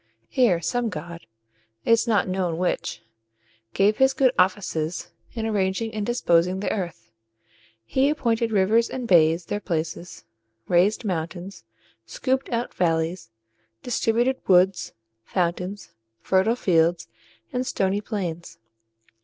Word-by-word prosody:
Here 225 -10 +3
some 240 +7 -1
god 170 -1 -8 0.6
it - - +2
is 230 +1 +4
not 215 -4 +2
known 185 -3 -1
which 180 +1 -2 0.7
gave 205 +2 +3
his 265 0 +4
good 265 -2 +4
offices 180 -3 0 0.2
in 225 -2 -3
arranging 210 +1 -1
and 215 -1 -2
disposing 185 -6 +2
the 205 - -2
earth. 175 - -5 0.7
He 265 - +2
appointed 230 -6 0
rivers 215 +3 +3
and 250 -2 -5
bays 165 -2 +4
their 205 - -3
places, 170 -1 -4 0.4
raised 185 +6 +2
mountains, 175 - -4 0.4
scooped 265 +1 -1
out 235 0 -2
valleys, 165 -1 -1 0.5
distributed 245 +2 0
woods, 185 0 +3 0.3
fountains, 180 - -3 0.3
fertile 190 - +2
fields, 170 - +2 0.5
and 250 - 0
stony 195 +2 0
plains. 180 -6 -5
190 Hz, 120 wpm, -24 LUFS, 175-230 Hz, 0.7 s, is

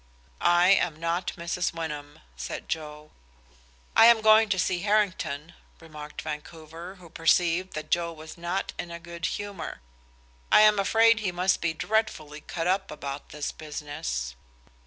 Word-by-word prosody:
"I 175 +1 +5
am 175 -5 +3
not 170 +2 -1
Mrs. 170 0 -2
Wyndham," 150 -3 -6
said - - -6
Joe. 150 -1 -5 0.8
"I 225 - +9
am 235 -2 +6
going 220 0 +6
to 195 - +1
see 180 0 +1
Harrington," 185 -7 0 0.3
remarked 150 -2 -9
Vancouver, 165 +4 -8
who 180 -3 -14
perceived 170 +2 +2
that 155 0 -6
Joe 170 -1 +1
was 160 0 -10
not 175 +3 -3
in 175 - -4
a 170 0 -7
good 170 0 -6
humor. 205 -4 -5 0.7
"I - - +8
am 210 -1 +6
afraid 225 +3 +4
he 200 -4 -1
must 180 +2 +1
be 170 -1 0
dreadfully 155 -9 -1
cut 165 +2 -4
up 190 +2 +1
about 140 -1 -6
this 150 0 -4
business." 145 - -5
170 Hz, 150 wpm, -27 LUFS, 155-190 Hz, 0.8 s, I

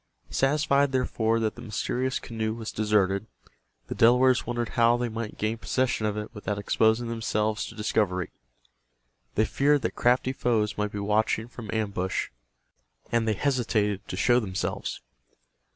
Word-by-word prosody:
Satisfied, 140 0 +2
therefore, 115 -3 +1
that 110 -2 0
the 120 - -11
mysterious 125 +3 -2
canoe 110 -1 -3
was 115 -1 -5
deserted, 105 -1 +1 0.6
the - - -5
Delawares 125 +2 +4
wondered 120 -1 -2
how 120 +1 +3
they 120 0 -1
might 115 -1 -5
gain 110 +2 -1
possession 125 -4 0
of 105 0 -2
it 105 +2 -5
without 105 -2 -3
exposing 110 +3 +2
themselves 110 -1 -1
to 115 - -10
discovery. 100 -4 0 1.0
They 110 - +3
feared 145 +1 +2
that - - -1
crafty 125 +2 +2
foes 110 -5 0
might 105 0 -2
be 105 - -5
watching 105 +2 +1
from 115 -3 -10
ambush, 100 -4 -1 0.8
and 115 -1 +1
they 110 - +3
hesitated 110 -6 0
to 90 - -5
show 120 +4 +4
themselves. 95 -5 -3
110 Hz, 150 wpm, -27 LUFS, 105-120 Hz, 1.0 s, Delawares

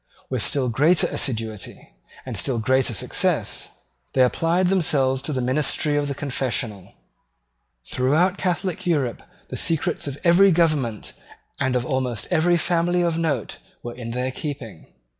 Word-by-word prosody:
With 130 -4 0
still 130 +6 +2
greater 150 +9 +3
assiduity 110 -5 -3 0.3
and - - -5
still 130 -3 0
greater 130 +3 +2
success - - 0 0.4
they 130 - +5
applied 170 +8 +2
themselves 140 -8 +2
to 155 - -4
the 130 -3 -1
ministry 145 +3 0
of 145 0 0
the 140 - -3
confessional. 125 - -3 0.9
Throughout 155 +9 +2
Catholic 180 -1 -2
Europe 140 -8 0 0.3
the - - -4
secrets 160 -2 0
of 140 -1 -5
every 185 +3 +6
government 155 - 0 0.5
and 130 -1 0
of 125 -1 0
almost 130 -3 -2
every 175 +1 +3
family 175 +1 +1
of 165 -1 0
note 160 -4 -2 0.2
were 120 - -5
in 120 -1 -7
their 125 +2 -2
keeping. 130 - -7
140 Hz, 140 wpm, -23 LUFS, 125-165 Hz, 0.9 s, every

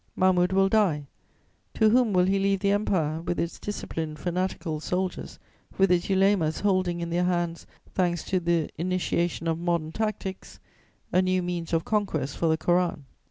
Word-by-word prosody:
Mahmud 185 -1 +3
will 195 0 +4
die: 195 -9 +2 0.7
to 220 -1 +4
whom 245 -2 +4
will 180 -2 +4
he 195 +1 +2
leave 195 -1 +1
the 200 -1 +2
Empire, 165 -6 0
with 175 +1 -3
its 170 - -3
disciplined, 160 -6 -5
fanatical 175 -2 -2
soldiers, 180 +3 -3 0.4
with 195 -1 +4
its 175 -1 +2
ulemas 190 -5 +2
holding 185 -4 +1
in 170 0 -4
their 175 +1 +1
hands, 175 -2 -1 0.3
thanks 175 -2 0
to 185 - 0
the 170 -2 +1
initiation 175 -1 -1
of 165 0 0
modern 170 -2 -1
tactics, 200 -1 -4 0.5
a 185 - +5
new 185 0 +1
means 175 -2 -4
of 165 -1 0
conquest 165 -10 -1
for 165 - 0
the 160 0 +2
Koran? 175 -3 0
180 Hz, 165 wpm, -26 LUFS, 165-190 Hz, 0.7 s, a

